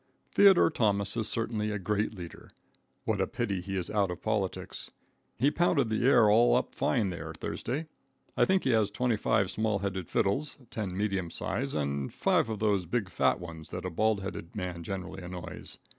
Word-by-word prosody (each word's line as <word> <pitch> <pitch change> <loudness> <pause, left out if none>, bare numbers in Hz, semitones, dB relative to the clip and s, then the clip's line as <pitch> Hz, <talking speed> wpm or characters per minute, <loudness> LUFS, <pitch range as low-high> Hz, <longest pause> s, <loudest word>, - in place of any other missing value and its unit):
Theodore 195 -4 +6
Thomas 100 -6 +1
is 110 -2 0
certainly 110 -2 -1
a 105 - -1
great 105 +3 0
leader. 85 -3 -9 0.6
What - - 0
a - - +1
pity 105 -7 -2
he 95 +1 -4
is 90 - -3
out 100 -3 +2
of 90 - -6
politics. 105 -4 -2 0.5
He 140 +4 +3
pounded 150 -8 +2
the 110 - 0
air 120 -5 +6
all 115 +3 +5
up - - 0
fine 95 +5 +1
there, 85 - -6
Thursday. 150 +6 -3 0.5
I - - +4
think 190 0 +2
he 130 - +2
has 110 -3 +3
25 110 -3 +1
small 110 0 0
size 100 0 -2
fiddles, 140 +10 0
10 95 -4 -3
medium 95 -4 -1
size, - - -3
and 70 -2 -1
5 - - +2
of 110 - -2
those 100 -4 +1
big, 110 0 -1
fat - - +2
ones 85 -3 -9
that - - -5
a 90 - -3
bald 110 +3 +1
headed 95 -3 -6
man 90 -4 -4
generally 95 +2 -5
annoys. 90 0 -7
105 Hz, 185 wpm, -30 LUFS, 90-110 Hz, 0.6 s, Theodore